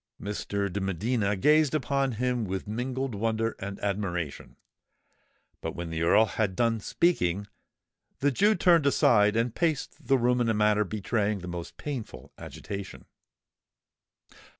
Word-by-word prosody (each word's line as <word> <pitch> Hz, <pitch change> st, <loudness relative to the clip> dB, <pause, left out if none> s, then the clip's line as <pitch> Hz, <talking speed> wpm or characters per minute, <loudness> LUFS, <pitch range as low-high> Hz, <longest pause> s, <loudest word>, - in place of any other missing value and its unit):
Mr. 100 Hz, 0 st, -3 dB
de 100 Hz, -, -2 dB
Medina 100 Hz, +3 st, 0 dB
gazed 150 Hz, +8 st, +3 dB
upon 135 Hz, -2 st, 0 dB
him 125 Hz, +1 st, -1 dB
with 95 Hz, -1 st, -4 dB
mingled 125 Hz, +4 st, -3 dB
wonder 110 Hz, +2 st, -1 dB
and 100 Hz, 0 st, -6 dB
admiration: 95 Hz, -6 st, -3 dB, 1.1 s
but -, -, -4 dB
when 85 Hz, -1 st, -5 dB
the 80 Hz, 0 st, -3 dB
Earl 95 Hz, +7 st, +5 dB
had 105 Hz, -3 st, -1 dB
done 115 Hz, 0 st, +1 dB
speaking, 100 Hz, -, +1 dB, 0.7 s
the 145 Hz, +1 st, +1 dB
Jew 205 Hz, -, +3 dB
turned 170 Hz, -4 st, +4 dB
aside 105 Hz, -6 st, +4 dB
and 115 Hz, 0 st, 0 dB
paced 160 Hz, -5 st, -2 dB
the 135 Hz, -, +4 dB
room 125 Hz, 0 st, +2 dB
in 115 Hz, -, +1 dB
a 110 Hz, -, +2 dB
manner 105 Hz, 0 st, +3 dB
betraying 105 Hz, +1 st, -1 dB
the 90 Hz, -, -7 dB
most 85 Hz, -1 st, -7 dB
painful 115 Hz, -, -7 dB
agitation. 100 Hz, -1 st, -7 dB
110 Hz, 140 wpm, -28 LUFS, 100-125 Hz, 1.1 s, Earl